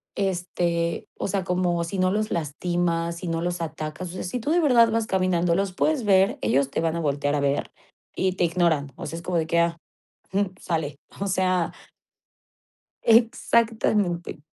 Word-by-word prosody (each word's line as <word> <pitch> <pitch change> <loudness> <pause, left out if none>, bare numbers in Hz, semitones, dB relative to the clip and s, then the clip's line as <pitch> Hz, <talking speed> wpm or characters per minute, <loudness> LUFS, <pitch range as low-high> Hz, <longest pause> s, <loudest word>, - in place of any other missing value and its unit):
este, 175 -3 -1
o - - -2
sea 195 -1 -1
como 180 -2 0
si 170 +4 -4
no 185 0 +3
los 215 +2 0
lastimas, 170 +2 -1
si 180 - -6
no 165 0 -1
los 175 0 -2
atacas, 155 +2 -5
o - - -11
sea 185 - -5
si 215 +8 -3
tú 265 +6 -2
de 345 - +4
verdad 240 -8 +5
vas 225 -1 0
caminando, 180 -2 +1
los 195 -1 -1
puedes 300 +4 +1
ver, 195 +6 +4
ellos 135 +1 +2
te - - -1
van 165 0 0
a 170 - -2
voltear 145 -1 0
a - - +1
ver 140 0 0 0.4
y 190 -1 +1
te 180 - -1
ignoran, 165 -5 +1
o - - -7
sea 165 - -5
es 170 - -8
como 180 -2 -1
de 160 - 0
que: 170 - +1
"Ah, 170 0 +1 0.6
jum, 195 -1 0
sale". 155 -5 -3 0.2
O 200 - -1
sea 185 -2 +1 1.3
Exactamente, 220 -6 +2
175 Hz, 185 wpm, -25 LUFS, 165-195 Hz, 1.3 s, verdad